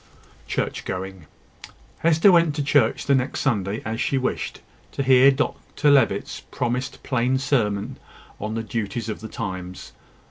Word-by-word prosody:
CHURCH - - -2
GOING. 95 -3 -6 0.7
Hester 165 +4 +5
went 170 -4 +4
to 145 - -1
church 145 0 +2
the 140 - +3
next 130 0 0
Sunday, 105 -5 -1
as 110 +1 -3
she 135 - +1
wished, 130 - -3 0.3
to 140 - -1
hear 130 0 +6
Dr 145 +2 0
Levitt's 130 -8 +2
promised 125 +2 -3
plain 130 0 +1
sermon 120 -3 -1 0.4
on 105 +2 -4
the 115 - -2
duties 115 +1 -3
of 105 - -4
the 110 - -7
times. 90 - -6
125 Hz, 145 wpm, -23 LUFS, 105-140 Hz, 0.7 s, hear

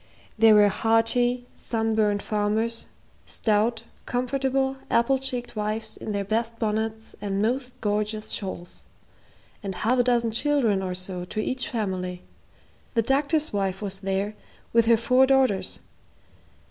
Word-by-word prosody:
There 220 -1 +6
were 205 0 +7
hearty, 225 +4 +2
sunburned 220 -3 0
farmers, 215 +2 0 0.4
stout, 220 +1 +1 0.2
comfortable, 265 +1 0
apple 260 +3 +3
cheeked 250 -3 -4
wives 215 +1 -2
in - - -6
their 200 -1 -2
best 230 +3 -1
bonnets 220 0 -2
and 195 -1 -2
most 250 +4 -1
gorgeous 210 +1 -1
shawls, 185 -4 -4 0.8
and 195 -3 -5
half 235 +7 +1
a - - +5
dozen 235 -2 +2
children 235 -5 +2
or 185 -1 -3
so 185 0 -4
to 200 - -5
each 255 +6 -1
family. 185 -7 -3 0.7
The 230 - +3
doctor's 290 +4 +1
wife 195 -2 -1
was 195 -2 -4
there, 195 +2 -1 0.4
with 230 -1 +4
her 230 -1 +6
four 250 +3 +4
daughters. 265 -7 +2
225 Hz, 135 wpm, -25 LUFS, 205-245 Hz, 0.8 s, were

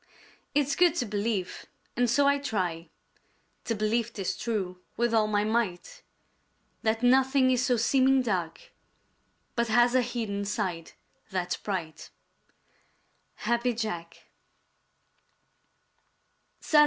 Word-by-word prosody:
It's 290 0 +2
good 350 -2 +4
to 250 - 0
believe, 205 -3 -3 0.3
and 245 0 +2
so 280 +4 +3
I 280 0 +3
try 180 - -3 0.8
To 230 - -1
believe 220 +2 0
'tis 195 -5 -3
true 190 -6 -3 0.2
with 235 0 +1
all 220 -1 +3
my 205 -1 +1
might, 225 - -2 0.8
That 225 +2 0
nothing 260 +1 +4
is 250 -1 +2
so 250 -2 +2
seeming 265 +3 +3
dark 180 -8 -3 0.8
But 235 0 +1
has 240 +2 +4
a 255 - +4
hidden 225 -4 -3
side 175 -5 -3 0.4
that's 180 -2 -2
bright. 175 -6 -5 1.3
_Happy 235 0 0
Jack. 170 -7 -5
230 Hz, 110 wpm, -28 LUFS, 195-250 Hz, 1.3 s, good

